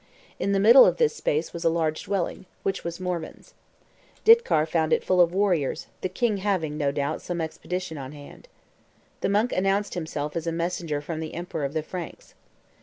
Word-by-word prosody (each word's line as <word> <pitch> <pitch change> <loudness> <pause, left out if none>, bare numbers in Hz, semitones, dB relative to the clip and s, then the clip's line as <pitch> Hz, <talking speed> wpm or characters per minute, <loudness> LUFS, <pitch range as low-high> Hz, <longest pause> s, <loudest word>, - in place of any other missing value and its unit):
In 200 - 0
the 195 - +2
middle 235 +6 +9
of - - +3
this 465 -1 +2
space 475 -2 -1
was 170 - -5
a 165 - +4
large 160 -1 -1
dwelling, 190 -1 -2 0.2
which 195 0 -2
was 170 +1 -5
Morvan's. 180 - -5 0.7
Ditcar 450 - +6
found 160 -1 0
it - - +2
full 185 -1 +3
of 170 -1 +4
warriors, 180 -7 0 0.2
the 185 - -1
king 230 -2 0
having, 185 -7 -1
no 145 -2 0
doubt, 145 +2 -2
some 175 -1 -4
expedition 165 0 -4
on 130 0 -7
hand. 145 - -13 0.7
The - - 0
monk 210 +5 +2
announced 195 +2 +1
himself 150 -3 -4
as 170 0 -3
a - - +1
messenger 165 -3 -2
from 155 +2 -5
the 160 -1 -6
emperor 165 -3 -4
of 140 - -4
the 155 -1 -1
Franks. 175 +1 -8
170 Hz, 190 wpm, -25 LUFS, 155-195 Hz, 0.7 s, middle